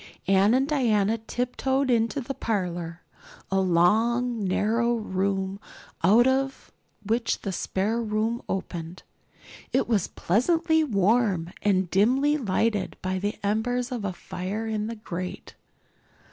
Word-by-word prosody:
Anne 195 +4 +4
and 265 +1 +2
Diana 225 -7 +2
tiptoed 255 +3 -1
into 230 +4 +1
the 265 +2 -4
parlor, 175 -7 -3 0.5
a 195 - +2
long 220 +7 +2
narrow 230 +5 +1
room 195 -2 -2 0.4
out 215 +7 +6
of 265 +1 0 0.3
which 230 +3 0
the 195 - -3
spare 205 +5 -1
room 220 +2 -1
opened. 175 -2 -5 0.7
It - - +1
was 215 -6 +1
pleasantly 320 - +2
warm 200 - +1
and 190 -3 +2
dimly 260 +9 +3
lighted 215 -5 0
by 185 0 -1
the 205 +2 -2
embers 240 +5 0
of 240 -4 -3
a 200 - -1
fire 185 +4 -5
in 215 -1 -2
the 230 - -5
grate. 185 -4 -6
215 Hz, 125 wpm, -26 LUFS, 190-240 Hz, 0.7 s, out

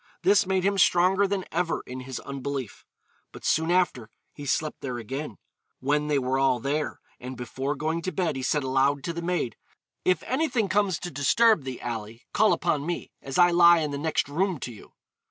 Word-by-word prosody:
This 195 -1 +4
made 190 -1 +1
him 200 0 +1
stronger 185 +3 +4
than 195 -1 -2
ever 170 0 -1
in 125 +1 -7
his 130 0 -6
unbelief. 140 -3 -5 0.5
But - - -11
soon 160 +1 +2
after 175 -11 +1 0.2
he 145 -1 -8
slept 155 +2 -1
there 125 -3 -4
again, 130 +1 -5 0.4
when 150 +3 0
they 150 -1 +2
were 130 0 0
all 135 -2 +3
there, 145 +5 -2 0.2
and 125 +1 -7
before 130 +4 -3
going 160 +3 -2
to 185 - -3
bed 175 -6 -1
he 135 - -4
said 145 +2 0
aloud 135 +1 +1
to 170 - -3
the 170 - -4
maid, 170 -8 -2 0.5
'If 185 - +2
anything 255 -7 0
comes 195 -2 +2
to 175 - -6
disturb 160 - +3
thee, 130 -2 -5
Ally, 115 -2 -5 0.2
call 215 0 +4
upon 155 -5 +1
me, 175 +2 -4
as 135 -1 -5
I 175 0 +6
lie 170 0 +7
in 150 -2 -2
the 140 - -3
next 155 -3 0
room 175 +3 -1
to 120 - -5
you.' 105 - -15
150 Hz, 200 wpm, -26 LUFS, 135-180 Hz, 0.5 s, lie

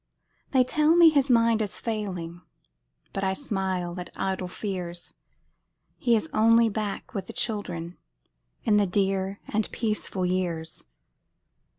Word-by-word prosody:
They 260 -2 +4
tell 305 +5 +3
me 340 -2 +8
his 280 -2 +2
mind 230 -2 +4
is 205 -3 -3
failing, 180 -7 -4 0.7
But 195 - -2
I 190 0 +1
smile 190 -7 -2
at 180 - -6
idle 190 -1 -2
fears; 180 -2 -5 0.9
He 235 -2 +3
is 225 - 0
only 230 +1 +5
back 210 -1 -4
with 195 -3 -4
the - - -8
children, 180 -5 -3 0.6
In 210 -1 +3
the 205 -1 +3
dear 195 +1 0
and 215 0 -1
peaceful 210 -4 -1
years. 175 -3 -2
195 Hz, 130 wpm, -26 LUFS, 180-225 Hz, 0.9 s, me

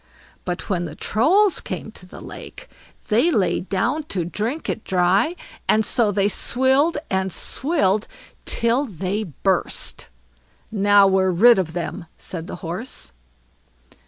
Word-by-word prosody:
But 180 0 -4
when 175 -3 -1
the 150 -2 -8
Trolls 365 - +2
came 190 +3 -6
to 180 - -13
the - - -12
lake, - - -10 0.4
they 235 +10 +3
lay 185 - +1
down 215 - -1
to 180 - -2
drink 225 - -3
it - - -3
dry; 190 - +2 0.3
and 220 0 +3
so 230 -3 +2
they 200 0 +1
swilled 265 - +2
and 190 0 0
swilled 215 - +1 0.4
till 235 +5 +2
they 200 - -3
burst. 185 +3 -1 0.6
"Now 205 -1 +5
we're 190 -1 +3
rid 205 +5 +6
of 165 -4 -2
them", 175 0 -5
said 170 -2 -6
the - - -6
Horse. 175 - -5
200 Hz, 135 wpm, -22 LUFS, 185-240 Hz, 0.6 s, rid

